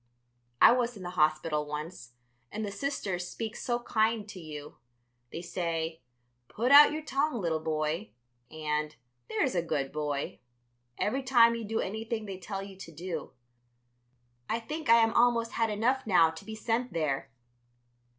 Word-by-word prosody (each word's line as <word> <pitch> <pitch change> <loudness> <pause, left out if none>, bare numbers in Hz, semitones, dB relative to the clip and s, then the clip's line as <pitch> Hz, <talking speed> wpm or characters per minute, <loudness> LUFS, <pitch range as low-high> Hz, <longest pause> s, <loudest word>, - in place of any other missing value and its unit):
I - - +9
was 245 -2 +1
in 190 - -9
the 180 - -5
hospital 155 -1 +1
once, 150 -4 -6 0.4
and 215 0 -3
the 200 - -4
Sisters 195 -9 -3
speak 225 -1 -5
so 240 -1 -2
kind 220 -1 +1
to 195 - -8
you. 150 -3 -9 0.5
They 170 - -6
say, 165 -2 -3 0.5
'Put 240 +4 -1
out 290 +1 +10
your 310 +1 -4
tongue, 280 -2 0
little 165 -4 0
boy,' 155 +5 -2 0.4
and 150 -1 -2 0.3
'There's 220 - +1
a 175 - +1
good 145 -5 -2
boy,' 145 -2 -3 0.6
every 260 +6 0
time 240 -3 +5
you 230 -1 -4
do 220 +1 -1
anything 220 +2 -3
they 195 -2 -6
tell 195 +1 -5
you 195 -1 -10
to 175 -3 -10
do. 165 0 -6 1.2
I 230 - 0
think 300 +4 -5
I 230 - +8
am 225 0 +1
almost 235 -1 +3
had 225 -1 0
enough 235 +5 0
now 165 -5 +5
to 160 - -11
be 220 - -6
sent 230 0 -1
there." 140 -5 -1
195 Hz, 160 wpm, -30 LUFS, 160-230 Hz, 1.2 s, out